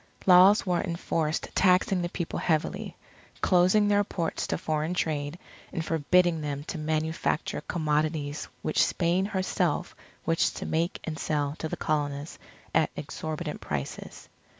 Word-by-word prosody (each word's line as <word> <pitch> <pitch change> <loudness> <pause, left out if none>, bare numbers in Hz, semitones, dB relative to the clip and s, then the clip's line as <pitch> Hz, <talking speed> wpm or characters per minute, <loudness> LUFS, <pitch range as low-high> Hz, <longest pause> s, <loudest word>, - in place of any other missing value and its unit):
Laws 190 +3 +7
were 180 -2 +1
enforced 165 -2 -2
taxing 185 0 +3
the 175 - -2
People 170 -1 -3
heavily, 160 -2 -1 0.4
closing 185 +3 +4
their 205 0 +4
ports 170 -4 -3
to - - -1
foreign 155 +2 -1
trade, 150 -2 -1 0.3
and 165 - -3
forbidding 165 +1 +2
them 145 -1 -3
to 165 +1 -5
manufacture 155 +1 -1
commodities 150 -2 -1 0.2
which 155 - +3
Spain 175 +2 +1
herself 185 -4 -1 0.3
wished 165 0 +1
to - - -4
make 165 +2 -1
and 160 -1 -5
sell 145 -1 -1
to 160 - -3
the - - -4
Colonists 145 -1 -2 0.3
at - - +3
exorbitant 155 0 -5
prices. 70 -2 -5
160 Hz, 135 wpm, -28 LUFS, 150-180 Hz, 0.4 s, Laws